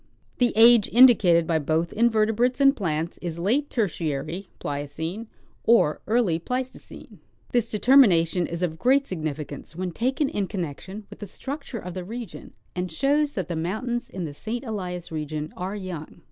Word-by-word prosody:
The 245 -1 +3
age 230 -1 +7
indicated 215 -9 +6
by 160 -1 +1
both 160 +3 -1
invertebrates 230 +2 +2
and 275 0 +5
plants 165 - -2
is 170 -2 -5
late 240 +12 0
Ter 225 -4 +1
tiary 160 +3 -4
(Pliocene) 160 +9 -5 0.4
or 220 -10 +3
early 215 -8 +2
Pleistocene. 255 +8 -6 0.3
This 235 -2 +1
determination 195 - +4
is 170 +1 -4
of 160 -2 -2
great 270 +2 +3
significance 155 -3 -5
when 180 +1 -3
taken 260 - 0
in 205 -7 -2
connection 190 +4 -6
with - - -11
the 205 - -7
structure 275 - -6
of 180 -4 -7
the 185 0 -5
region, 230 +5 -8 0.2
and 180 -1 -3
shows 285 - +1
that 185 -5 -3
the 170 - -3
mountains 220 +9 -3
in 185 -2 -5
the 150 - -6
St. 225 - -5
Elias 180 -8 -5
region 155 -1 -4
are 185 +3 -4
young. 180 -6 -7
190 Hz, 160 wpm, -25 LUFS, 165-235 Hz, 0.4 s, age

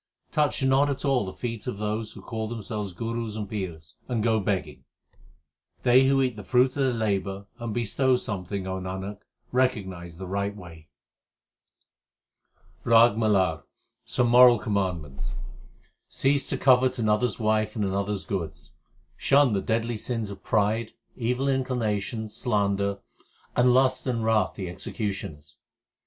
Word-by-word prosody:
Touch 150 -2 +1
not 135 +2 +4
at 140 +1 -3
all 135 -6 +2
the - - -4
feet 115 +2 -5
of 125 - -3
those 105 +1 -3
Who - - -12
call 110 -1 -4
themselves 105 -3 -4
gurus 115 +3 -4
and 105 -2 -4
pirs, 85 -6 -6
and 120 -4 -1
go 110 -1 +3
begging. 95 -8 -2 1.0
They 130 +2 +6
who 135 0 +3
eat 125 -3 -1
the 105 - -8
fruit 125 +5 +3
of - - -22
their 135 -2 +1
labour 100 -4 -2
and 115 -1 -4
bestow 120 +4 +1
some 105 -6 -3
thing, 95 +2 -4
Nanak, 95 +2 -5 0.3
recognize 95 -10 -1
the 95 - -6
right 100 +2 -2
way. 85 -5 -12 2.0
RAG 115 -1 +6
MALAR 95 -8 +2 0.4
Some 120 -1 +1
moral 125 0 +8
commandments: 90 -10 -3 0.7
Cease 140 0 +1
to - - -2
covet 130 -1 +4
another 110 +1 +2
s - - -4
wife 110 -1 +1
and 105 -3 0
another 100 +1 -1
s 95 - -4
goods; 80 -6 -5 0.5
shun 140 -4 +4
the 100 - +1
deadly 115 +2 -1
sins 115 -3 -3
of 100 - -10
pride, 110 +2 +1 0.2
Evil 125 +2 -1
inclinations, 115 -5 -1
slander, 100 -3 0 0.6
and 125 0 +5
lust 130 +1 +3
and 115 -3 -1
wrath 110 -1 +2
the 95 - -5
execu 95 +4 -4
tioners. 75 -6 -8
110 Hz, 150 wpm, -26 LUFS, 100-125 Hz, 2.0 s, moral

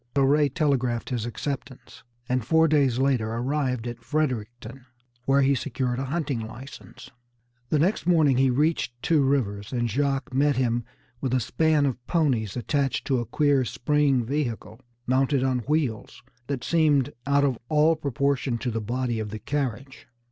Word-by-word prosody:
So 140 - +4
Ray 145 +2 +3
telegraphed 130 -5 0
his 120 -2 -2
acceptance, 130 -3 -6 0.3
and 125 -1 0
four 160 +7 +4
days 140 -5 +2
later 130 -5 +1
arrived 130 -1 -1
at 120 -1 -6
Fredericton, 125 -2 -3 0.4
where 135 0 +3
he 135 +1 +3
secured 125 -2 -2
a 135 - -2
hunting 145 -3 -2
license. 115 +5 -10 0.6
The 155 - +2
next 175 +4 +1
morning 155 -7 +4
he 135 0 +4
reached 130 -2 0
Two 160 -4 +3
Rivers, 110 -6 -1
and 120 -2 0
Jacques 135 +2 -1
met 140 +2 +2
him 120 -2 0 0.4
with 130 -2 0
a - - +3
span 155 +4 +1
of 125 -3 -2
ponies, 125 - 0
attached 135 +2 -1
to 130 -3 +1
a 120 - -4
queer 145 -3 +2
spring 135 0 +1
vehicle, 120 -4 -3 0.3
mounted 130 +1 +2
on 130 -1 +1
wheels 140 -4 -2 0.2
that 135 -4 -3
seemed 150 -5 +2
out 140 0 +3
of 130 -5 0
all 155 +1 +4
proportion 140 -3 -1
to 125 +1 -3
the 115 0 -2
body 120 +1 -2
of 110 -1 -4
the 110 - -5
carriage. 135 0 -4
135 Hz, 160 wpm, -25 LUFS, 120-145 Hz, 0.6 s, So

